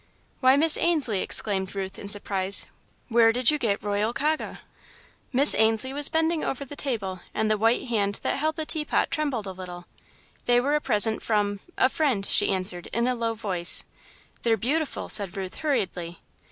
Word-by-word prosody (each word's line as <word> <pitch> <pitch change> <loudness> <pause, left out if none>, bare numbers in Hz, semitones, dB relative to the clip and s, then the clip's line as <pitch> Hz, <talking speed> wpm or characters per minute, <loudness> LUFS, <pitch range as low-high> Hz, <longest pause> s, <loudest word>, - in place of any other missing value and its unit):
"Why, 260 0 +4
Miss 315 +1 +4
Ainslie," 290 - 0
exclaimed 195 -2 +1
Ruth, 190 0 -6
in 200 - -9
surprise, 200 -1 +3 0.4
"where 230 -1 +4
did 250 +4 +3
you 300 - -2
get 215 -5 -1
Royal 205 +2 -1
Kaga?" 310 +4 -2 0.7
Miss 275 +3 +6
Ainslie 220 +4 +1
was 290 0 +2
bending 320 0 0
over 275 +1 -4
the 290 - -10
table, 210 -10 -4 0.2
and 215 0 0
the 215 - +1
white 225 +2 +1
hand 205 -5 -2
that - - -1
held 310 +2 -1
the 315 - -4
teapot 305 -1 0
trembled 290 -9 -2
a 190 - -6
little. 180 -1 -10 0.6
"They 245 0 +4
were 280 +4 -1
a 300 - +1
present 220 -3 +3
from 205 -2 -1 0.2
a - - +4
friend," 265 -9 -1
she - - +2
answered, 185 -2 -1
in 235 +2 -2
a 255 - +1
low 230 -2 -3
voice. 185 -6 +2 0.6
"They're 230 -1 +1
beautiful," 290 +8 -2
said 200 -2 +1
Ruth, 190 -1 -6
hurriedly. 180 - -3
225 Hz, 180 wpm, -24 LUFS, 200-280 Hz, 0.7 s, Miss